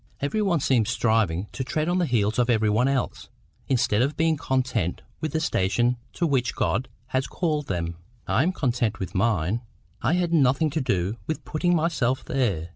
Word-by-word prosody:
Every 145 +10 -1
one 185 -6 +2
seems 120 -6 +2
striving 105 -6 +1
to 130 - -4
tread 155 +4 -1
on 175 +1 +1
the 175 - +1
heels 110 -2 +1
of 125 0 +2
every 110 -3 +3
one 120 +5 +3
else, 135 -2 -2 0.4
instead 120 -4 +2
of 140 +4 0
being 160 0 +3
content 130 - -1 0.2
with 155 -2 -3
the 160 - +1
station 120 - +1 0.2
to 175 - 0
which 135 -6 +1
God 125 - 0 0.2
has 130 0 0
called 155 -5 -1
them. 85 -2 -3 0.3
I - - +2
am 170 +6 +2
content 120 - 0
with 95 - -5
mine. 100 0 +1 0.4
I - - +2
had 175 -1 +1
nothing 140 0 +3
to 155 +2 -1
do 100 -4 0
with 155 - -3
putting 175 +3 +1
myself 150 -6 0
there. 100 -12 -1
130 Hz, 190 wpm, -25 LUFS, 110-155 Hz, 0.4 s, every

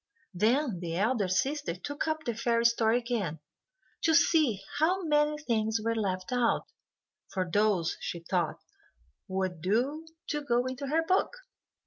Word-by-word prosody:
Then 225 - +1
the 170 -1 -3
elder 210 0 +1
sister 270 - 0
took 290 - -4
up 315 0 -1
the 240 - -2
fairy 235 +1 +1
story 230 0 +4
again, 230 -10 -2 0.6
to 320 -1 +3
see 305 - +3 0.2
how 365 +5 +2
many 300 -1 +2
things 225 -6 0
were 230 +1 0
left 185 -3 -2
out, 245 -2 +1 0.6
for 185 -1 -2
those, 200 -2 +1
she 170 - -5
thought, 170 -1 -1 0.7
would 185 -3 -2
do 255 - 0 0.2
to 295 -1 -1
go 245 -3 +1
into 260 +2 -4
her 320 +4 +1
book. 375 +8 +1
235 Hz, 145 wpm, -29 LUFS, 190-295 Hz, 0.7 s, story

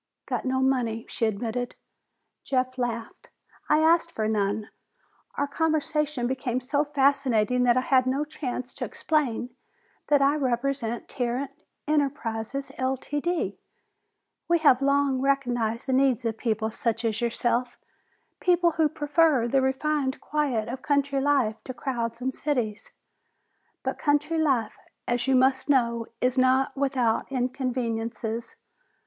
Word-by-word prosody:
"Got - - -3
no 260 0 +1
money," 245 -4 0
she 225 - 0
admitted. 230 +3 -3 0.7
Jeff 255 -1 -1
laughed. 235 -2 -4 0.4
"I 300 +1 +4
asked 335 +1 +4
for 215 -8 -1
none! 210 0 -1 0.6
Our 285 - 0
conversation 300 -2 0
became 255 -1 -1
so 285 +3 0
fascinating 270 -5 +2
that 240 0 +4
I - - +4
had 255 -1 +3
no 275 +3 0
chance 255 -5 -5
to - - -6
explain 255 -6 -1 0.6
that 290 -1 +4
I 280 +2 +3
represent 250 -3 -1
Tarrant 250 +2 -2 0.4
Enterprises, 275 -4 -1
Ltd. 290 +6 -1 0.9
We 340 - +4
have 285 -5 +4
long 280 -1 +2
recognized 245 -5 0
the 260 - -1
needs 260 -2 +2
of 225 -1 0
people 220 -1 -1
such 230 +1 -2
as 225 +1 0
yourself, 240 +1 0 0.6
people 350 -1 +3
who 315 -1 +2
prefer 295 -4 +2
the 270 +3 +2
refined 265 +1 0
quiet 275 -8 -1
of 255 +2 -5
country 280 -1 +1
life 265 -6 +1
to 255 - -6
crowds 235 -2 -3
and 260 +1 -1
cities. 245 -9 -2 0.9
But - - -3
country 300 +2 +1
life, 260 -8 +1 0.3
as 240 +1 0
you 265 - +4
must 260 +2 +3
know, 235 -4 +2
is 255 +1 +2
not 260 +2 +3
without 265 -4 0
inconveniences. 235 -3 -2
260 Hz, 130 wpm, -26 LUFS, 235-285 Hz, 0.9 s, I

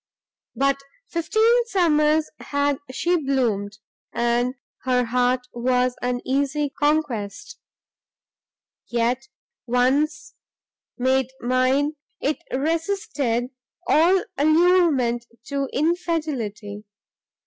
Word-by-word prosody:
But 275 0 +2 0.3
fifteen 440 +8 +3
summers 310 -6 +3
had 285 -1 0
she 345 +7 +1
bloomed, 235 -9 -1 0.3
and 240 +2 0 0.3
her 250 -1 +2
heart 250 +2 +1
was 250 +1 +1
an 245 0 -1
easy 280 +2 0
conquest; 290 - -1 1.3
yet, 240 +2 0 0.4
once 270 +5 +1 0.6
made 260 0 +1
mine, 255 +4 +1 0.2
it 295 +2 -1
resisted 285 -5 -1 0.3
all 350 +5 +4 0.2
allurement 310 -7 +3 0.2
to 275 -1 -2
infidelity. 275 - -2
275 Hz, 80 wpm, -23 LUFS, 245-310 Hz, 1.3 s, all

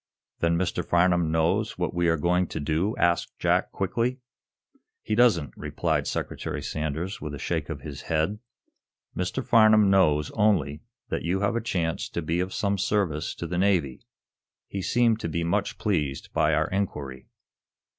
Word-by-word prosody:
"Then 85 0 +2
Mr. 90 0 -1
Farnum 85 -2 +2
knows 85 +7 +1
what 90 -1 -2
we 85 0 +1
are 80 0 +3
going 90 +3 +1
to - - -5
do?" 80 +8 0
asked 85 0 +1
Jack, - - +1
quickly. 115 +6 -1 0.9
"He 110 - -2
doesn't," 105 - +3
replied - - -1
Secretary - - -4
Sanders, 80 +5 -3
with 75 -2 -5
a - - -6
shake - - -2
of - - -5
his - - -7
head. 80 +6 0 0.8
"Mr. 90 +8 -2
Farnum 110 -3 +6
knows, 75 -6 +3
only, 85 -9 +1 0.3
that - - -2
you 90 +4 -1
have 100 +2 +1
a 115 - 0
chance 85 -7 -2
to 85 - -4
be 85 +3 -1
of 90 +1 -1
some 100 0 -1
service 90 -7 0
to - - -5
the 85 +1 -2
Navy. 90 -9 +1 0.7
He 100 - -4
seemed 115 +2 +2
to 85 - -3
be 85 +1 -1
much 100 +4 -1
pleased 75 -10 -2
by 75 0 +3
our 80 +1 +1
inquiry." 70 -10 -3
90 Hz, 165 wpm, -26 LUFS, 80-100 Hz, 0.9 s, Farnum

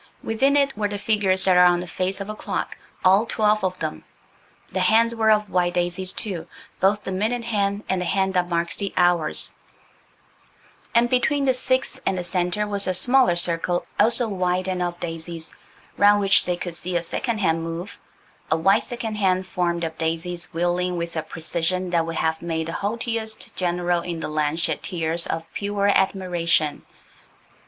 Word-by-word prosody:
Within 270 +6 +2
it 280 -1 +2
were 210 0 0
the 205 0 -4
figures 200 -3 +1
that 185 -1 +5
are 180 - +8
on 175 0 +4
the 180 - -5
face 185 +3 -3
of 200 - -5
a 215 - -4
clock–all 200 0 0
twelve 215 -2 +2
of 185 -1 -1
them. 80 - -4 0.7
The 190 - 0
hands 225 +5 +4
were 220 -1 +2
of 210 -1 +3
white 175 -1 +1
daisies, 175 +1 -1
too, 180 -6 -5 0.3
both 205 +2 +2
the - - -4
minute 220 +6 -1
hand 205 -2 -1
and 190 -1 0
the - - -2
hand 190 +1 +1
that 180 -1 +1
marks 170 0 0
the 200 -1 -4
hours, 175 -3 +2 1.4
and 235 +1 +5
between 275 +3 +1
the 260 - +4
VI 255 +1 0
and 190 - 0
the 180 - -2
centre 180 +3 -1
was 200 -1 -1
a 185 - +1
smaller 245 0 +4
circle, 175 0 +2
also 235 +1 +4
white 185 -2 -1
and 185 -1 -2
of 175 0 -2
daisies–round 170 +4 -1
which 195 -1 +4
they 180 -1 -1
could 175 -1 -5
see 180 +2 -4
a 170 - -2
second 235 +7 -2
hand 165 -5 +1
move–a 165 -1 -6
white 195 +6 +4
second 230 -4 -5
hand 190 -2 +1
formed 175 -2 -1
of 160 0 -4
daisies 165 +1 -3
wheeling 175 +1 0
with 170 0 -4
a 160 - 0
precision 175 +3 -2
that 165 -1 +1
would 165 - -4
have 160 0 0
made 165 -1 -2
the - - -4
haughtiest 220 +1 -3
general 175 -1 0
in 170 -1 -4
the - - -3
land 150 +1 -1
shed - - 0
tears 170 -2 -2
of 165 0 -3
pure 200 0 0
admiration. 175 -6 +1
185 Hz, 180 wpm, -23 LUFS, 170-210 Hz, 1.4 s, are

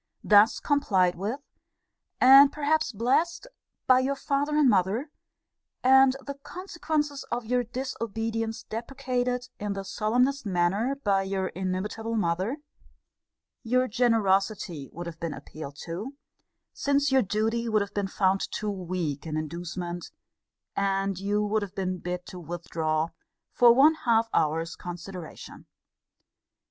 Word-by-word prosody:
Thus 210 +2 +5
complied 195 - +2
with, 210 +10 -4 0.8
and 275 +2 +8
perhaps 300 -2 0
blessed, 265 - 0 0.4
by 255 0 +6
your 270 +2 0
father 285 +2 -1
and 300 -3 +5
mother, 215 - +1 0.7
and 265 0 +6
the 280 - -4
consequences 315 -5 -3
of 240 -1 -2
your 245 +2 +1
disobedience 225 -2 -3
deprecated 250 +1 -3
in 205 -1 -2
the 195 0 -5
solemnest 250 +8 0
manner 200 +6 0
by 205 -8 +1
your 190 -1 -2
inimitable 190 +5 -3
mother, 190 - 0 1.0
your 255 +2 +1
generosity 200 - +1
would 175 +1 -7
have 165 -1 -8
been 165 -3 -4
appealed 145 0 -9
to, 200 +12 -6 0.6
since 280 0 +1
your 265 0 +5
duty 225 +3 -1
would 215 -2 +2
have 200 - -10
been 200 -1 -1
fount 195 0 +1
too 210 -1 -3
weak 175 -6 -4
an 155 -1 -2
inducement, 175 +2 -5 0.7
and 195 -1 0
you 205 +2 0
would 215 +1 0
have 200 -1 -6
been 185 -2 -2
bid 180 0 -4
to 180 - -9
withdraw 165 -2 -2 0.4
for 240 0 +6
one 275 +6 +6
half 230 -6 +1
hour's 160 +2 0
consideration. 175 -1 -9
215 Hz, 130 wpm, -27 LUFS, 185-255 Hz, 1.0 s, and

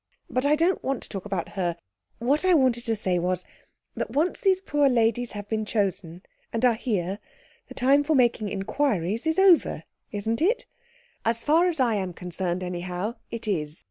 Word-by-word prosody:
But 255 +2 +1
I 295 - +5
don't 335 +5 +1
want 270 -1 -2
to - - -9
talk 195 -2 -5
about 195 -4 -3
her. 175 -3 -2 0.4
What 275 +8 +1
I 370 -1 +5
wanted 255 -5 +2
to 225 - +1
say 185 -4 0
was, 180 +1 -1 0.5
that - - -3
once 315 +6 0
these 380 -2 +3
poor 290 -6 +2
ladies 235 0 +1
have 205 -1 -6
been 220 0 -1
chosen 190 -5 -2 0.3
and 230 +2 +1
are 245 - +5
here, 205 -5 -2 0.5
the - - -11
time 275 +3 +4
for 310 +1 +1
making 240 -5 +2
inquiries 205 - -1
is 320 - +1
over, 380 -3 +4 0.3
isn't 220 +4 -2
it? 450 +8 +2 0.6
As 230 +1 0
far 330 +4 +4
as 325 -4 -4
I 245 -3 +3
am 190 -4 -2
concerned, 180 +1 -3
anyhow, 180 +4 -3 0.2
it 230 -1 -6
is. 155 -6 -1
225 Hz, 185 wpm, -26 LUFS, 190-280 Hz, 0.6 s, I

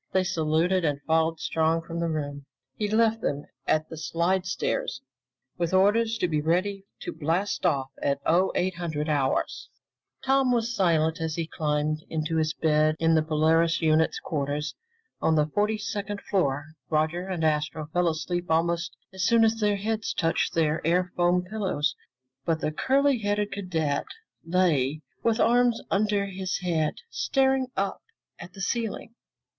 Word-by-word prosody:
They 190 - +3
saluted 170 +1 +1
and 145 -3 0
followed 160 0 +1
Strong 165 +1 +1
from 170 0 -5
the 170 0 0
room. 145 -3 -4 0.3
He 210 -1 -2
left 225 +1 +2
them 145 0 -2 0.2
at 155 0 +2
the 160 - -9
slidestairs 185 - -1 0.6
with 170 +1 0
orders 220 +4 +3
to 180 - +1
be 155 -3 0
ready 190 +5 0 0.2
to - - -5
blast 170 +5 0
off 135 -5 0
at 140 0 0
0800 175 -3 +1
hours. 140 -3 0 0.6
Tom 270 -1 +3
was 240 0 0
silent 165 -5 +2
as 160 -1 -2
he 165 - -2
climbed 155 -1 -1
into 160 0 -1
his 155 -1 +1
bed 155 -1 +2
in 165 0 +3
the 160 - +4
Polaris 160 +2 +2
unit's 160 0 +2
quarters 145 0 -2 0.5
on 160 - +3
the 150 -1 +3
forty 210 +7 0
second 205 -1 -4
floor. 145 -8 -1 0.2
Roger 160 +4 0
and 180 -4 -3
Astro 155 0 0
fell 180 0 +2
asleep 175 +2 -3
almost 165 +1 +1 0.2
as 190 - -5
soon 230 +4 +5
as 225 0 +2
their 210 -1 +2
heads 220 +2 -2
touched 165 -1 0
their 160 -1 +1
air 180 +2 +1
foam 175 0 +2
pillows, 190 -6 -1 0.5
but 160 +1 0
the 155 - -1
curly 270 - +2
haired 205 0 -1
cadet 160 -7 -1 0.4
lay 160 -5 +1 0.2
with 230 0 +1
arms 240 -1 +4
under 205 0 +2
his 190 -1 -3
head, 165 -4 0 0.2
staring 265 -1 +1
up 195 0 -1 0.4
at 180 - -10
the 195 - -9
ceiling. 225 +2 -2
170 Hz, 155 wpm, -26 LUFS, 155-200 Hz, 0.6 s, soon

